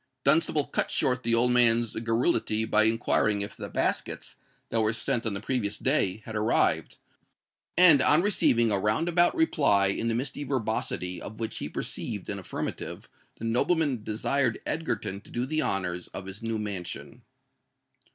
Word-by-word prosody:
Dunstable 150 +1 +3
cut - - -1
short 125 -1 0
the 115 -1 +1
old 125 +2 +3
man's 120 -2 +3
garrulity 115 -1 0
by 110 0 +3
inquiring 110 -2 +2
if 100 - -7
the - - -7
baskets, - - -2 0.3
that 115 - +1
were 110 0 +1
sent 115 0 -1
on 105 - -2
the - - -3
previous 110 -2 -2
day, 110 -7 0
had 110 - -7
arrived; 105 0 +1 0.8
and, 165 -6 +8
on 150 +5 +5
receiving 120 - +2
a 100 - +2
round 105 - 0
about 175 0 +3
reply 140 - +3
in 115 +4 -2
the 115 - 0
misty 135 +4 -3
verbosity 110 -8 -2
of 110 - -9
which 115 -1 -4
he - - -4
perceived - - -5
an - - -3
affirmative, - - -6 0.3
the 115 - -7
nobleman 130 +2 +1
desired 115 +3 0
Egerton 105 -11 -3
to - - -18
do 120 +1 -2
the 155 +3 -1
honours 90 -2 -2
of 95 - -8
his 95 +1 -9
new 115 0 -2
mansion. 100 -5 -6
115 Hz, 165 wpm, -27 LUFS, 105-135 Hz, 0.8 s, and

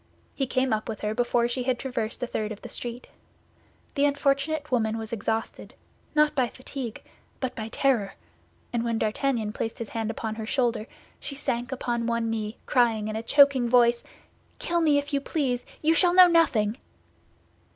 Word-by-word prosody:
He 270 - -1
came 255 -1 +1
up 215 +1 -2
with 220 - -5
her 210 0 -1
before 240 0 +1
she 240 +2 -2
had 250 0 0
traversed 240 -3 -4
a - - +2
third 215 -3 -3
of 210 - -8
the - - -7
street. 240 +1 -5 0.9
The 285 -1 +2
unfortunate 285 +1 0
woman 225 -3 +1
was 225 +1 -6
exhausted, 225 +1 -3 0.4
not 300 0 +4
by 260 -4 +2
fatigue, 255 -2 -7 0.4
but 260 -2 -2
by 220 -1 -4
terror, 225 -5 0 0.6
and 235 -1 0
when 230 -1 0
D'Artagnan 220 0 -1
placed 225 - -4
his 230 - -6
hand 225 -1 -3
upon 225 -1 -3
her 220 0 -5
shoulder, 240 -4 0 0.3
she 280 - -6
sank 245 -3 -2
upon 240 -3 -2
one 235 -1 0
knee, 215 0 -3
crying 225 -4 +2
in 215 - -4
a 220 - -2
choking 275 -1 +5
voice, 240 -1 +4 0.5
"Kill 345 0 0
me, 300 -3 +4
if 285 +1 -3
you 280 - +1
please, 265 -5 -1 0.2
you 320 +1 +4
shall 350 +1 +4
know 370 0 +10
nothing!" 255 -11 +3
240 Hz, 180 wpm, -26 LUFS, 225-275 Hz, 0.9 s, know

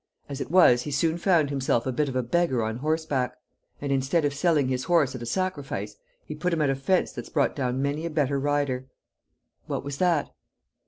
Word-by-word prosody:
As 140 -1 -6
it - - -4
was 160 -9 +6
he 150 - -5
soon 160 +4 0
found 170 -6 +3
himself 130 -4 0
a 130 - 0
bit 145 +3 0
of 130 - -6
a 130 - +1
beggar 130 -2 +1
on 110 +1 -2
horseback. 145 -3 -1 0.4
And 140 -1 -3
instead 140 +4 +1
of 145 - 0
selling 150 -2 +2
his 130 0 -2
horse 165 -7 +3
at 130 - -7
a 120 - -5
sacrifice, 140 - -3 0.3
he - - -6
put 170 +4 -2
him 160 - 0
at 140 - +2
a - - 0
fence 175 +8 +1
that's 120 -3 -8
brought 145 -3 +1
down 130 -1 -1
many 145 +4 -1
a - - -4
better 145 -3 0
rider." 140 -2 -1 0.8
"What - - -3
was 140 0 -5
that?" 170 -4 +1
140 Hz, 215 wpm, -26 LUFS, 130-160 Hz, 0.8 s, was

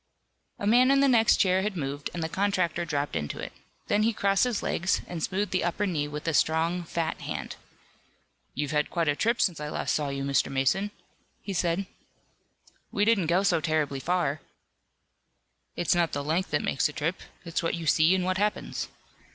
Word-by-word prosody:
A - - -4
man 245 +5 +5
in 275 0 +5
the 280 - +5
next 230 -4 +5
chair 185 0 +3
had 200 -1 -2
moved 145 -1 -3
and 170 - -4
the - - 0
contractor 185 -2 0
dropped 145 -2 -2
into 75 0 -3
it. - - -6 0.3
Then 205 - +2
he 225 +2 +2
crossed 200 +1 +2
his 245 -4 -2
legs, 190 +4 0
and 170 -2 -6
smoothed 195 +3 -1
the 185 - +1
upper 175 +4 0
knee 155 -6 -1
with 150 +2 -6
a 165 - +1
strong, 165 +4 +2
fat 165 -1 -3
hand. - - -5 1.0
"You've 145 +1 -2
had 150 -1 +1
quite 170 -3 -1
a 145 - +2
trip 230 +8 +1
since 175 -6 +1
I 150 0 -4
last - - -1
saw 150 -2 0
you, 140 0 -3
Mr. 140 0 +1
Mason," 135 +10 +1 0.5
he 200 - -4
said. 175 +1 0 1.1
"We 205 - +1
didn't 210 -7 +3
go 175 +4 +3
so 175 -5 +2
terribly 155 -3 0
far." 155 -1 0 1.3
"It's 175 - +1
not 170 -4 +1
length 155 +6 -1
that 145 - 0
makes 135 - +1
a - - -9
trip. 160 +5 -2 0.2
It's 170 0 -2
what 165 - -1
you 170 -1 -6
see 160 +4 +4
and 185 -1 0
what 185 0 0
happens." 210 +1 -1
170 Hz, 195 wpm, -27 LUFS, 150-195 Hz, 1.3 s, man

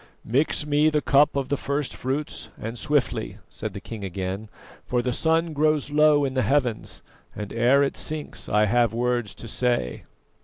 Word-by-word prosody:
"Mix 140 +5 +1
me 150 +1 +3
the 150 -1 +1
cup 145 0 +4
of 135 -2 -1
the 145 - +1
first 140 +1 -2
fruits, 135 +4 -3
and 115 +2 -5
swiftly," 145 +1 -1
said - - -5
the - - -6
king 110 -3 -8
again, 95 +3 -4 0.3
"for 125 - -1
the 125 0 0
sun 165 +3 +1
grows 150 -1 +1
low 150 -1 +5
in 135 - -2
the 130 - +1
heavens, 130 -6 0 0.3
and 105 -1 -6
ere 125 +5 +4
it 140 - -1
sinks 155 -1 -4
I 105 +1 +4
have 115 +1 +2
words 120 -2 -1
to 115 - -9
say." 120 - -1
130 Hz, 180 wpm, -25 LUFS, 115-150 Hz, 0.3 s, low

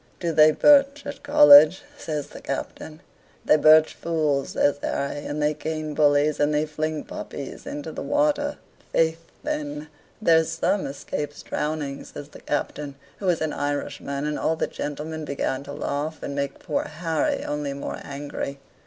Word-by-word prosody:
"Do 170 -2 -1
they 155 -1 +7
birch 280 - +5
at 285 - -7
College?" 290 0 +8
says 150 - -4
the - - -11
Captain. 155 +1 -6 0.4
"They - - +6
birch 155 +1 +6
fools," 155 -5 -1
says 145 - +2
Harry, 145 +1 -2
"and 145 - -3
they 150 0 +2
cane 155 0 -4
bullies, 145 0 +3
and 145 +1 +3
they 150 +1 +1
fling 155 0 -3
puppies 140 -2 -8
into 150 +2 -5
the - - -6
water." 290 0 +1 0.3
"Faith, 165 0 +2 0.2
then, 150 0 -4 0.3
there's 165 -5 +3
some 185 +4 0
escapes 145 +1 -5
drowning," 150 -2 -3
says 145 0 -10
the - - -14
Captain, 145 -1 -3 0.2
who 195 - -3
was 175 -3 +2
an 155 -1 -1
Irishman; 145 0 -3
and 150 0 -2
all 160 - +1
the - - -1
gentlemen 155 +2 -5
began 140 -2 -2
to 140 - -8
laugh, 145 +2 -4
and 140 - -4
made 140 -1 -3
poor 150 - -2
Harry 160 -1 -1
only 145 -1 -3
more 140 - -5
angry. 140 0 -5
150 Hz, 160 wpm, -24 LUFS, 145-160 Hz, 0.4 s, College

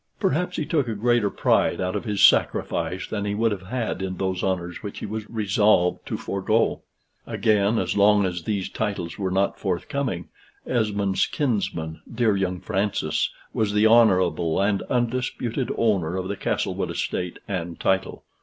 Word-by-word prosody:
Perhaps 180 +6 0
he 155 - -1
took 145 -4 0
a 115 - -2
greater 120 0 +2
pride - - +2
out 90 0 -1
of - - -3
his 105 -3 +4
sacrifice 95 - +2
than 105 -2 -3
he 100 0 -1
would 115 +1 +2
have 95 -2 -5
had 120 -4 -2
in 95 -1 -3
those 95 -1 -1
honors 90 -2 -2
which 100 -2 -7
he - - -5
was 110 0 -5
resolved 105 -4 +2
to - - -2
forego. 105 +4 0 0.5
Again, 105 -1 +2
as - - -1
long 105 0 +5
as 90 -2 -2
these 100 +1 -2
titles 100 -5 -3
were 95 -2 -1
not 95 +2 0
forthcoming, 95 - -2 0.4
Esmond's 100 -5 +1
kinsman, 100 - -2
dear 115 -3 +2
young 90 -2 -1
Francis, 95 -7 -1 0.2
was 105 -2 0
the 105 +1 +3
honorable 95 -7 +4
and 100 0 +1
undisputed 125 0 -1
owner 95 -6 +1
of 95 0 -3
the 100 - -3
Castlewood - - -2
estate 90 -1 -3
and 85 -4 -4
title. 95 0 0
100 Hz, 165 wpm, -24 LUFS, 95-110 Hz, 0.5 s, long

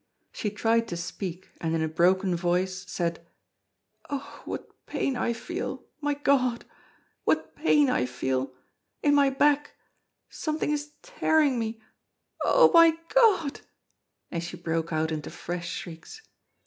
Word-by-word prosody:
She 210 - -2
tried 225 +2 +1
to 170 - -4
speak, 180 +1 -6
and 165 -1 0
in 160 - +1
a - - +1
broken 180 +3 +2
voice 180 +2 -1
said: 170 -1 -2 0.9
"Oh! 280 -1 -6
what - - -6 0.2
pain 270 - -1
I 235 - 0
feel 345 - -5
my 290 -1 0
God! 260 -4 +1 0.6
what - - 0
pain 295 -2 +4
I 250 - +1
feel 130 +1 -2 0.5
in 290 - +4
my 285 -1 +5
back 290 +2 +2 0.5
something 310 -1 -2
is 295 0 -3
tearing 315 - +2
me 225 0 -4 0.6
Oh! - - +6
my 335 -1 +7
God!" 400 - +3 0.7
And 170 0 -2
she 175 +1 -6
broke 165 -1 -2
out 160 0 0
into 155 -2 -4
fresh 175 0 -5
shrieks. 175 - -8
225 Hz, 135 wpm, -27 LUFS, -, 0.9 s, my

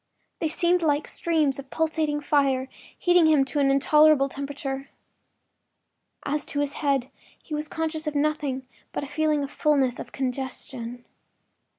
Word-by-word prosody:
They 320 - 0
seemed 345 +3 +2
like 295 -2 +1
streams 310 -5 +1
of 275 -1 -9
pulsating 315 -2 0
fire 275 -3 +2 0.3
heating 350 -2 +4
him 300 -4 +4
to 290 +2 -2
an 275 -1 +3
intolerable 290 +1 +5
temperature. 275 -1 -5 1.4
As 290 +1 -1
to 285 - -3
his 290 -1 0
head, 275 -3 +1 0.3
he 310 - -8
was 300 0 -2
conscious 315 0 -3
of 300 - -2
nothing 285 -3 0 0.3
but - - -2
a - - -5
feeling 300 0 +1
of 280 - -5
fullness—of 275 -5 +1
congestion. 250 -2 -4
290 Hz, 145 wpm, -25 LUFS, 275-310 Hz, 1.4 s, intolerable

